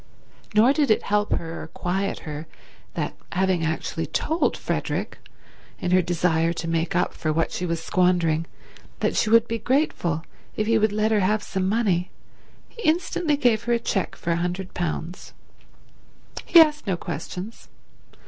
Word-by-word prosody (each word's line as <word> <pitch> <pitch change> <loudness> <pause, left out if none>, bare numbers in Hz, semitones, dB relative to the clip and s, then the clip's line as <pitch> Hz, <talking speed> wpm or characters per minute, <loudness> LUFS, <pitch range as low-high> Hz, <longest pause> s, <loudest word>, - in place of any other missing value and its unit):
Nor 235 +6 +6
did 290 -2 +1
it 215 - +3
help 210 +1 +1
her 165 0 -4
or - - -7
quiet 190 +4 -2
her 155 0 -6 0.5
that, - - -2 0.2
having 185 -2 +1
actually 160 0 -2
told 320 - 0
Frederick, - - -3 0.6
in 180 - -2
her 185 0 +5
desire 170 -1 +1
to 165 - -5
make 165 +1 -1
up 180 - +1
for 155 - -2
what 165 +1 0
she 180 - -3
was 165 -1 -2
squandering, 170 -3 +2 0.5
that - - 0
she 215 - +2
would 230 +1 +5
be 230 0 -2
grateful 215 - 0 0.3
if 215 - 0
he 225 0 +3
would 215 -1 +2
let 215 +1 +1
her 215 - +3
have 205 +2 +1
some 190 0 -1
money, 195 -5 +1 0.6
he 470 - -12
instantly 325 -3 +1
gave 235 -5 +2
her 240 - +2
a - - +4
cheque 200 -4 -2
for 170 - -1
£100. 175 -1 -4 1.1
He 340 - +8
asked 300 -5 +4
no 185 -3 0
questions. 190 +5 -6
185 Hz, 160 wpm, -24 LUFS, 170-225 Hz, 1.1 s, He